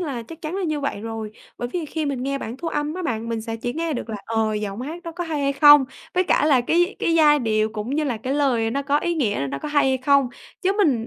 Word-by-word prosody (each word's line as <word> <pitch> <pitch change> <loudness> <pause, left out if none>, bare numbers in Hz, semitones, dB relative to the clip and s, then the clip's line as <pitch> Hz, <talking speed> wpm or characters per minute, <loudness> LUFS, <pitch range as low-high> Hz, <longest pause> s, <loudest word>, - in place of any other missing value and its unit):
là 275 -9 -3
chắc 325 +8 -12
chắn 315 +3 -4
là 390 - -2
như 310 -4 -1
vậy 280 -7 -3
rồi, 225 -1 -5 0.3
bởi 245 - -3
vì 340 +3 -3
khi 310 0 -3
mình 270 -3 -2
nghe 275 +1 -1
bản 235 +1 -6
thu 330 +3 -4
âm 295 0 -2
á 370 - -4
bạn 230 -5 -2
mình 230 -1 -2
sẽ 225 0 -4
chỉ 240 +2 -3
nghe 325 +1 -2
được 240 - -4
là, 215 - -3
ờ, 220 -1 0
giọng 210 +1 -4
hát 325 +6 -6
đó 335 - -6
có 350 +1 -4
hay 310 -3 -2
hay 275 0 +1
không, 290 0 +8 0.3
với 365 +1 +3
cả 300 - +2
là 270 -5 +5
cái 350 - +1
cái 330 - +1
giai 300 -2 +6
điệu 215 -3 +1
cũng 220 +2 -4
như 305 0 +1
là 250 -5 -1
cái 255 +5 -3
lời 245 -6 +1
nó 280 +3 -1
có 285 +1 +2
ý 345 +1 -1
nghĩa 205 - 0
nó 140 - -3
có - - -5
hay 290 -2 +3
hay 260 -1 +1
không, 275 -1 +3 0.3
chứ 380 - +2
mình 250 - +2
275 Hz, 295 wpm, -23 LUFS, 230-310 Hz, 0.3 s, không